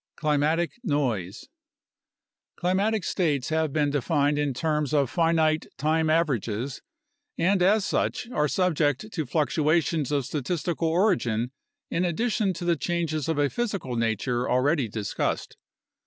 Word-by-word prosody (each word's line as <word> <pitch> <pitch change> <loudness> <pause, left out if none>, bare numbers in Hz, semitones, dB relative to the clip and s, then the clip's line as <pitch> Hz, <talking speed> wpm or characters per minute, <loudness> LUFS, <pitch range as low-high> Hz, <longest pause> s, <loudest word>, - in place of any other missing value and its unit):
Climatic 155 +2 +1
Noise 125 - -1 1.1
Climatic 195 +4 0
states 150 -9 0
have 160 -1 0
been 145 -1 +1
defined 145 0 +1
in 145 -1 +1
terms 150 +2 -1
of 140 -4 +2
finite 160 -2 +2
time 160 +1 +1
averages 135 - 0 0.6
and 185 +3 +2
as 200 +2 +4
such - - -1
are 150 -9 +1
subject 160 - 0
to 160 -7 -2
fluctuations 155 +1 +1
of 140 -3 0
statistical 165 +4 -2
origin 160 - +1 0.4
in 180 - 0
addition 205 +3 0
to 175 +1 -6
the 170 -1 +3
changes 165 -2 -2
of 160 - 0
a 145 -1 +3
physical 200 - -3
nature 115 +2 -1
already 135 +1 +2
discussed. 105 -2 -3
155 Hz, 125 wpm, -26 LUFS, 140-170 Hz, 1.1 s, as